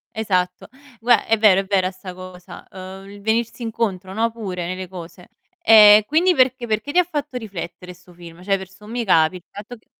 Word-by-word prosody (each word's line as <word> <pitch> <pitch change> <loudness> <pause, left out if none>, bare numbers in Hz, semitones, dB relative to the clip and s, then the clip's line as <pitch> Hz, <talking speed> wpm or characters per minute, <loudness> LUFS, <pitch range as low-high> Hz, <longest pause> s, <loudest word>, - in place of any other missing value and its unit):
Esatto. 180 -4 -2 0.3
Gua 240 +1 +3
è 225 - +1
vero, 205 -3 +5
è 195 - -5
vera 190 -1 0
'sta 185 0 -10
cosa, 185 -1 -12
ehm, 190 +1 -11
il 205 0 -12
venirsi 230 +3 -1
incontro, 205 -5 -3
no, 225 +3 0
pure 190 -6 -6
nelle 185 +1 -6
cose. 175 -1 -11 0.3
Eh, 210 -1 +8
quindi 345 +4 +2
perché 255 -2 +1
perché 220 +5 -2
ti 355 - 0
ha 360 - +5
fatto 295 -5 -5
riflettere 185 -5 -8
'sto 180 0 -20
film? 170 0 -14
Cioè, 195 +1 +1
per 190 -1 -9
sommi 210 +5 -7
capi, 165 -2 +3
il 180 - -13
fatto 215 +4 -10
che 220 - -28
200 Hz, 200 wpm, -20 LUFS, 185-225 Hz, 0.3 s, Eh